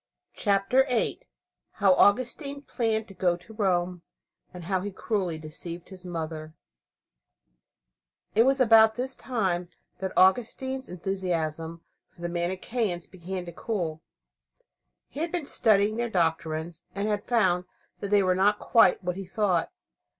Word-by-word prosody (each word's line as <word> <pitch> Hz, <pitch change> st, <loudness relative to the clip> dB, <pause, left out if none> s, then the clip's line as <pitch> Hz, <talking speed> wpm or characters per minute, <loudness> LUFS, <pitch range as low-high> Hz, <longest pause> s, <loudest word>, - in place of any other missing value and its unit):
CHAPTER 200 Hz, +6 st, +3 dB
VIII 245 Hz, -2 st, 0 dB, 0.5 s
HOW 195 Hz, -3 st, +4 dB
AUGUSTINE 255 Hz, -, +2 dB
PLANNED 225 Hz, -5 st, -1 dB
TO 195 Hz, -, -12 dB
GO 180 Hz, -2 st, +1 dB
TO 215 Hz, +5 st, -15 dB
ROME, 180 Hz, -4 st, 0 dB, 0.5 s
AND 180 Hz, -2 st, -9 dB
HOW 185 Hz, +1 st, 0 dB
HE 205 Hz, +2 st, -4 dB
CRUELLY 190 Hz, -5 st, -2 dB
DECEIVED 165 Hz, +2 st, -9 dB
HIS 185 Hz, -1 st, -10 dB
MOTHER 160 Hz, -2 st, -5 dB, 1.8 s
It 220 Hz, -, +5 dB
was 270 Hz, +2 st, +3 dB
about 225 Hz, -3 st, +6 dB
this 255 Hz, +2 st, -3 dB
time 185 Hz, -8 st, -1 dB, 0.3 s
that 190 Hz, -1 st, -3 dB
Augustine's 250 Hz, +7 st, +2 dB
enthusiasm 170 Hz, -3 st, -3 dB, 0.3 s
for 175 Hz, -, -19 dB
the 175 Hz, -, -2 dB
Manicheans 180 Hz, +2 st, -2 dB
began 185 Hz, 0 st, -6 dB
to 170 Hz, -, -7 dB
cool. 170 Hz, -5 st, -3 dB, 1.1 s
He 280 Hz, -, -9 dB
had 330 Hz, +1 st, -1 dB
been 350 Hz, -5 st, -2 dB
studying 215 Hz, -4 st, +3 dB
their 235 Hz, 0 st, -1 dB
doctrines, 165 Hz, -2 st, -1 dB
and 200 Hz, +1 st, -1 dB
had 205 Hz, -1 st, -2 dB
found 185 Hz, -7 st, +2 dB, 0.3 s
that 200 Hz, -, -4 dB
they 205 Hz, -1 st, +4 dB
were 185 Hz, -1 st, +3 dB
not 200 Hz, +3 st, +3 dB
quite 200 Hz, -5 st, +4 dB
what 180 Hz, 0 st, -2 dB
he 195 Hz, -, -5 dB
thought. 190 Hz, -4 st, 0 dB
190 Hz, 140 wpm, -27 LUFS, 175-220 Hz, 1.8 s, about